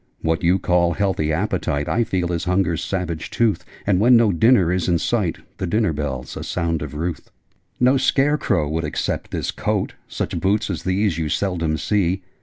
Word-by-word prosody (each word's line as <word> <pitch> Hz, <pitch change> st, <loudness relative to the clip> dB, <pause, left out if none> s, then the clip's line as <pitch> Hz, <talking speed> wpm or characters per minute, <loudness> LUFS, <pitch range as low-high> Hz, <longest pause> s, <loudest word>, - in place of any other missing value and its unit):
What 80 Hz, 0 st, +1 dB
you 90 Hz, +2 st, +3 dB
call 90 Hz, -2 st, +2 dB
healthy 95 Hz, -5 st, 0 dB
appetite 80 Hz, -4 st, -1 dB
I 120 Hz, -, +2 dB
feel 90 Hz, -5 st, -1 dB
as 85 Hz, -, -2 dB
Hunger's 90 Hz, -2 st, +1 dB
savage 90 Hz, -4 st, -3 dB
tooth: 115 Hz, -3 st, +1 dB, 0.2 s
And, 100 Hz, -3 st, +2 dB
when 120 Hz, +3 st, +6 dB
no 115 Hz, -3 st, +4 dB
dinner 95 Hz, -1 st, +4 dB
is 90 Hz, -1 st, 0 dB
in 85 Hz, -, +3 dB
sight, 95 Hz, -1 st, 0 dB, 0.2 s
The 95 Hz, -, -2 dB
dinner 105 Hz, -2 st, +1 dB
bell's 70 Hz, -4 st, -4 dB
a -, -, -5 dB
sound 85 Hz, -2 st, -1 dB
of 75 Hz, -1 st, -6 dB
ruth! 85 Hz, +3 st, -4 dB, 0.5 s
'No 130 Hz, +2 st, +4 dB
scare 140 Hz, +3 st, +2 dB
crow 85 Hz, -8 st, +1 dB
would 80 Hz, +2 st, -2 dB
accept 75 Hz, -, -2 dB
this -, -, -2 dB
coat: -, -, -2 dB
Such -, -, -3 dB
boots 105 Hz, +2 st, +1 dB
as 85 Hz, -3 st, -4 dB
these 95 Hz, -2 st, +1 dB
you 80 Hz, -2 st, -1 dB
seldom 85 Hz, -5 st, -1 dB
see. 95 Hz, -1 st, 0 dB
90 Hz, 190 wpm, -21 LUFS, 80-105 Hz, 0.5 s, when